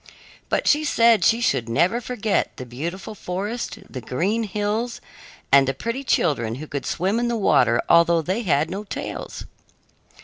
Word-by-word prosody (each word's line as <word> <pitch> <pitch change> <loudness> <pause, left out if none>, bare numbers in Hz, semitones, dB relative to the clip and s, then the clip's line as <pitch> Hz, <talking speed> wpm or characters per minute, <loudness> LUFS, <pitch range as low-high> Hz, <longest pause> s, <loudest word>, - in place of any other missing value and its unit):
But - - 0
she 300 +1 +4
said 230 -6 +4
she 230 - +4
should 120 - 0
never 175 - +2
forget 225 -4 -1
the 130 - -6
beautiful 170 - -6
forest, 205 +5 -4
the 130 - -7
green 195 - -1
hills, 210 +4 -2 0.5
and 135 -1 +6
the 135 - -1
pretty 230 - -4
children 125 - +1
who 150 +5 -7
could 140 -2 -5
swim 195 +6 0
in 240 - 0
the 235 -1 -1
water 120 - +3
although 170 -1 +4
they 190 +8 -1
had 155 -7 +1
no 200 +3 -4
tails. 205 - -6
190 Hz, 165 wpm, -23 LUFS, 145-230 Hz, 0.5 s, and